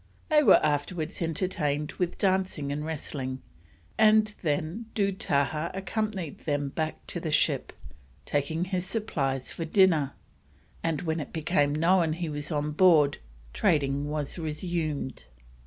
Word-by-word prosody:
They 305 -1 +6
were - - +7
afterwards 155 +3 -1
entertained 160 -4 -1
with 180 -1 -1
dancing 185 -7 0
and 145 +1 -3
wrestling, 135 -4 -4 0.6
and 215 0 +5
then 165 +7 -2
Dootahah 170 -6 0
accompanied 195 -3 -3
them 145 -2 -1
back 155 +2 -4
to - - -5
the - - -3
ship, - - +1 0.5
taking 160 +4 -1
his 185 -1 -2
supplies 135 - -2
for 165 - -4
dinner; 165 -5 +3 0.7
and 165 -2 -1
when 160 -1 -1
it 150 - -6
became 150 -3 +1
known 165 0 +3
he 170 0 -3
was 145 +1 -4
on 150 0 -1
board, 155 -3 +5 0.3
trading 140 -1 +1
was 150 +2 -3
resumed. 155 - -3
160 Hz, 130 wpm, -28 LUFS, 145-185 Hz, 0.7 s, were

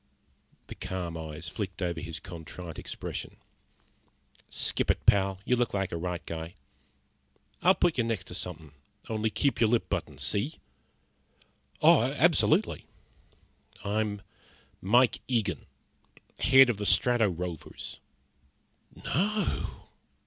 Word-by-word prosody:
The - - -8
calm 90 -3 -5
eyes 80 0 -6
flicked 95 -4 -5
over 85 -3 -2
his 85 -2 -5
contrite 85 0 -8
expression. - - -6 1.1
"Skip - - -1
it, - - +1
pal. 95 -1 +4
You 125 - +3
look 120 -3 0
like 95 -2 -1
a - - -3
right 90 +1 -4
guy. 80 +1 -6 1.1
I'll 185 +2 +5
put 170 -6 +1
you - - +4
next 115 -5 -2
to - - -7
somethin'. 90 -5 -6 0.4
Only 110 0 0
keep 140 +4 0
your 115 - +5
lip 120 0 +1
buttoned, - - -3
see?" 110 +11 0 1.3
"Oh, - - +7
absolutely." - - +2 1.0
"I'm 105 0 -1 0.6
Mike 120 +6 +4
Eagen 110 -7 -1 0.7
head 135 -1 +7
of 110 - -5
the 105 0 -1
Strato 120 -4 +5
Rovers." 90 -2 -6 1.1
"No!" 210 +6 -1
100 Hz, 120 wpm, -29 LUFS, 85-120 Hz, 1.3 s, Oh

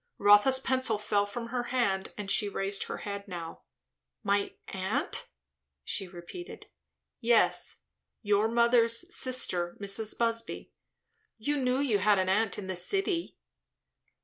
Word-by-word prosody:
Rotha's 205 +6 +5
pencil 260 -4 +1
fell 205 -1 0
from 230 +3 -6
her 245 0 -2
hand 200 -7 -1
and 200 -1 -3
she 205 -2 +4
raised 195 0 -3
her - - -5
head 200 -1 -5
now. 170 -3 -7 0.6
"My 200 -1 0
aunt?" 190 0 -2 0.6
she 195 - 0
repeated. 180 - -10 0.5
"Yes. 235 -2 +2 0.4
Your 205 +1 +2
mother's 235 +6 +3
sister; 180 -9 0
Mrs. 205 +2 0
Busby. 230 0 +1 0.7
You 290 +7 -1
knew 255 -1 +1
you 260 -7 +1
had 205 +1 +3
an 185 0 +1
aunt 210 0 +1
in 205 - -6
the 190 0 -4
city?" 345 - -1
210 Hz, 130 wpm, -29 LUFS, 195-240 Hz, 0.7 s, Rotha's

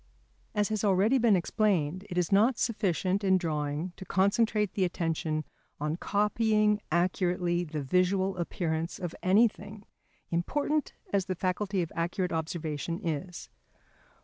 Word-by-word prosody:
As 210 0 +1
has 215 -1 -1
already 205 +6 +3
been 230 -4 +5
explained, 185 -2 0
it 180 - -5
is 175 -2 +1
not 225 +5 +4
sufficient 195 -3 0
in 190 -1 +4
drawing 155 0 -2
to - - -8
concentrate 210 +2 +1
the 195 - 0
attention 165 -3 -1 0.3
on 150 +2 -1
copying 210 +2 +2
accurately 175 0 +1
the 155 -3 -4
visual 185 +5 +1
appearance 165 -1 -2
of 175 -3 -5
anything, 205 +1 +2 0.5
important 290 - 0 0.2
as 195 -2 +2
the 185 - -2
faculty 185 +1 -1
of 165 - -7
accurate 175 +2 -1
observation 160 -1 -3
is. 170 +3 -4
185 Hz, 130 wpm, -29 LUFS, 170-205 Hz, 0.5 s, been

